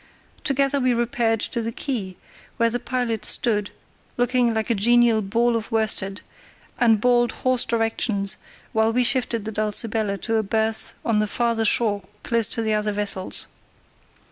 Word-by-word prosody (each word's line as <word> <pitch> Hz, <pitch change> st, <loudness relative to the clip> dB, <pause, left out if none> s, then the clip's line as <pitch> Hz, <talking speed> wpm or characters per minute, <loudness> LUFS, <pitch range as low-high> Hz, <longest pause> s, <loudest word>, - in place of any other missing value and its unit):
Together 275 Hz, 0 st, +1 dB
we 255 Hz, -2 st, +2 dB
repaired 235 Hz, -2 st, 0 dB
to 235 Hz, +2 st, -2 dB
the 230 Hz, 0 st, -3 dB
quay, 220 Hz, -8 st, -4 dB, 0.4 s
where 230 Hz, 0 st, +2 dB
the 245 Hz, -, -2 dB
pilot 240 Hz, -4 st, -2 dB
stood, 210 Hz, -2 st, +2 dB, 0.5 s
looking 245 Hz, 0 st, +2 dB
like 220 Hz, +1 st, -1 dB
a -, -, +4 dB
genial 235 Hz, +1 st, +3 dB
ball 230 Hz, +4 st, +1 dB
of 225 Hz, +1 st, -4 dB
worsted, 205 Hz, -3 st, -1 dB, 0.6 s
and 225 Hz, -3 st, +4 dB
bawled 240 Hz, 0 st, +3 dB
hoarse 255 Hz, -1 st, +4 dB
directions 225 Hz, -3 st, 0 dB, 0.4 s
while 220 Hz, 0 st, +2 dB
we 250 Hz, +2 st, +2 dB
shifted 240 Hz, -4 st, 0 dB
the 220 Hz, -, -4 dB
Dulcibella 215 Hz, -1 st, 0 dB
to 225 Hz, -1 st, 0 dB
a -, -, +2 dB
berth 220 Hz, +1 st, -1 dB
on 220 Hz, -2 st, +2 dB
the 215 Hz, -, +1 dB
farther 230 Hz, 0 st, 0 dB
shore 210 Hz, -2 st, +2 dB, 0.2 s
close 230 Hz, -3 st, +1 dB
to 230 Hz, -, -1 dB
the 220 Hz, -1 st, 0 dB
other 210 Hz, 0 st, 0 dB
vessels. 200 Hz, -2 st, -2 dB
225 Hz, 160 wpm, -23 LUFS, 215-240 Hz, 0.6 s, a